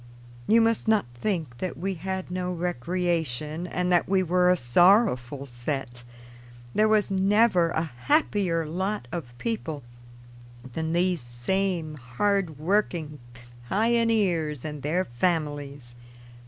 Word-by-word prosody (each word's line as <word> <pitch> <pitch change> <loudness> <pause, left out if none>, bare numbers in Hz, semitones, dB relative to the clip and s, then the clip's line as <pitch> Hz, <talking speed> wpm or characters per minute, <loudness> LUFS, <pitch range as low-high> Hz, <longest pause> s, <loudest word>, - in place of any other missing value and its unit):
You 230 +1 +5
must 225 0 +1
not 220 - +3
think 150 - -3
that 185 - -4
we 195 +3 -2
had 190 +1 -5
no 180 0 -2
recreation 170 -2 -2
and 180 0 -1
that 175 0 +3
we 190 -1 +3
were 180 +1 +3
a 180 - +4
sorrowful 145 - +3
set. 120 -1 -4 0.7
There 215 - +3
was 215 -2 +2
never 195 -2 +3
a 160 -1 -1
happier 170 - 0
lot 190 -1 -3
of 125 -9 -6
people 160 - -4 0.9
than 160 +2 -2
these 175 -2 +1
same 155 +6 -2
hard 160 +6 -1
working 160 -3 -1 0.5
pioneers 205 - +1
and 150 -2 -5
their 170 +7 0
families. 145 -2 -2
175 Hz, 120 wpm, -26 LUFS, 145-195 Hz, 0.9 s, You